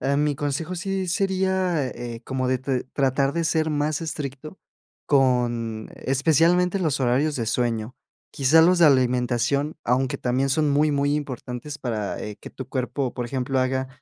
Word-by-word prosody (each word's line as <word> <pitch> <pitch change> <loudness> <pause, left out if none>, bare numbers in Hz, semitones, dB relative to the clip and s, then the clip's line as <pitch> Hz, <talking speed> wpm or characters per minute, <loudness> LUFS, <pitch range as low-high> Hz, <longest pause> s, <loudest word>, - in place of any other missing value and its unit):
em, 140 +2 +1
mi 150 -1 +1
consejo 145 +5 -3
sí 190 +1 -2
sería, 190 -4 0
eh 120 -2 -6
eh, - - -12
como 130 -1 -2
de 130 0 +1
t 130 0 -2
tratar 135 0 +1
de 170 +2 -1
ser 160 -1 +1
más 150 +1 -1
estricto 150 +1 -6 0.5
con 120 -5 +1
especialmente 165 +7 +2
los 155 -7 0
horarios 135 +4 +1
de 115 -2 -2
sueño. 115 0 -1 0.4
Quizás 150 +4 +4
los 180 +1 +4
de 165 - +8
alimentación, 125 +2 +2
aunque 125 +1 0
también 130 +2 0
son 150 +2 +2
muy, 150 +2 +3
muy 145 0 +1
importantes 140 0 -5
para, 110 -5 -3
eh, 105 -1 -6
que - - -10
tu 130 -1 -8
cuerpo, 130 0 -2
por 125 - -3
ejemplo, 130 +1 -2
haga, 130 0 0
135 Hz, 165 wpm, -24 LUFS, 125-155 Hz, 0.5 s, de